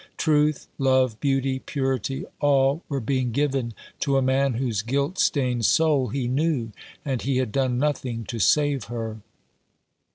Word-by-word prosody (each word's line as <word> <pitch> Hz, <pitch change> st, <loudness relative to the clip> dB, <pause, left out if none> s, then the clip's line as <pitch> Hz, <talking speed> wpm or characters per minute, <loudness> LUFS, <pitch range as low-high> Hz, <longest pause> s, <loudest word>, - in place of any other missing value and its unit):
Truth, 150 Hz, -2 st, +2 dB
love, 130 Hz, -4 st, +2 dB
beauty, 135 Hz, -1 st, 0 dB
purity, 135 Hz, -2 st, -2 dB
all 140 Hz, +1 st, +3 dB
were 140 Hz, -2 st, -1 dB
being 130 Hz, 0 st, -1 dB
given 135 Hz, -3 st, -1 dB, 0.2 s
to 140 Hz, -1 st, +1 dB
a -, -, +3 dB
man 130 Hz, 0 st, +2 dB
whose 115 Hz, -5 st, -1 dB
guilt 140 Hz, -, -1 dB
stained 125 Hz, -5 st, +2 dB
soul 150 Hz, -5 st, +3 dB
he 125 Hz, +2 st, -2 dB
knew; 135 Hz, -3 st, 0 dB, 0.3 s
and 130 Hz, -4 st, -1 dB
he 135 Hz, 0 st, 0 dB
had 130 Hz, -4 st, -1 dB
done 130 Hz, -1 st, 0 dB
nothing 130 Hz, -4 st, -1 dB
to 115 Hz, -, -5 dB
save 140 Hz, -, +2 dB
her. 115 Hz, -1 st, -5 dB
135 Hz, 150 wpm, -24 LUFS, 120-140 Hz, 0.3 s, all